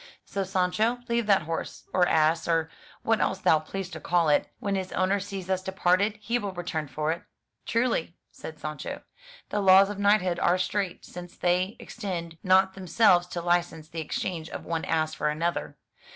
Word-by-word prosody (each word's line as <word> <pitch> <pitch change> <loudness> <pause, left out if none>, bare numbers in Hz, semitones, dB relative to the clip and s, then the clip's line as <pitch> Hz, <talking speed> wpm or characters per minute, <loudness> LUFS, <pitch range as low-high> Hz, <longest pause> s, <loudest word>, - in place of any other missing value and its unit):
So, 195 - -2
Sancho, 190 +5 +1
leave 235 -2 0
that 195 -4 +4
horse, 165 +1 -5
or 180 -1 +4
ass, 160 0 +2
or 165 -1 +1 0.3
what 225 -1 +2
else 190 - +1
thou 160 -4 +4
pleasest 185 +4 -6
to 160 - -6
call 170 +1 +2
it; 145 - +2
when 200 - -2
his 190 -1 -2
owner 190 +2 +1
sees 195 -2 -6
us 190 -1 0
departed, 190 +2 +1
he 235 +3 -1
will 200 -3 -4
return 175 -4 -3
for 150 +3 -1
it.'* 170 - -3 0.3
* - - -50
Truly," 230 -8 0
said 160 - -9
Sancho, 150 0 -6 0.5
'*the 210 - -1
laws 195 +1 +7
of 205 - -7
knighthood 200 -4 +3
are 175 +1 +3
strait, 185 0 -2
since 175 0 -10
they 180 +3 +1
extend 170 -7 -6
not 190 0 +4
themselves 185 -1 +3
to 175 -1 -5
license 175 -2 0
the 165 0 -4
exchange 160 +1 -4
of - - -7
one 165 -1 -2
ass 155 -1 0
for 150 - -1
another. 165 +3 -2
180 Hz, 185 wpm, -27 LUFS, 165-195 Hz, 0.5 s, laws